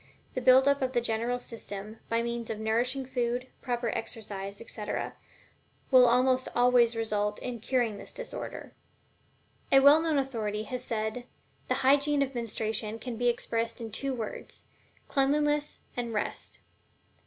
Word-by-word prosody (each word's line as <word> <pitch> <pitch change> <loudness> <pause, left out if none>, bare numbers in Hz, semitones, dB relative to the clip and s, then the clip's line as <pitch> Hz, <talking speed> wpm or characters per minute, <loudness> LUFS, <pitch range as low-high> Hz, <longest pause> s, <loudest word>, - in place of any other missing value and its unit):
The 255 - -2
building 260 +2 +6
up 280 - -1
of 260 0 0
the 240 - +3
general 235 +1 -1
system, 215 -3 -8
by 230 0 +1
means 235 -1 -3
of 220 - -3
nourishing 240 +5 0
food, 245 0 -1 0.2
proper 240 -1 -1
exercise, 205 -3 -5
etc., 215 -2 -4 0.8
will 255 -2 +8
almost 255 +2 +3
always 245 -1 +4
result 210 -2 -1
in 245 -2 -5
curing 235 -2 0
this - - -11
disorder. - - -7 1.0
A 270 - +8
well 285 +3 +7
known 320 -2 +1
authority 220 -6 -1
has 250 +3 -4
well 230 - 0 0.2
said: 245 +1 -8 0.4
"The - - +1
hygiene 285 +1 +4
of 275 0 -5
menstruation 220 -2 -3
can 240 +1 -6
be 245 +2 0
expressed 230 0 -1
in 225 -2 -6
two 270 +5 -2
words: 225 -3 -7 0.4
CLEANLINESS 295 +1 +1
AND 235 -2 -3
REST." 210 - -3
240 Hz, 150 wpm, -29 LUFS, 225-260 Hz, 1.0 s, will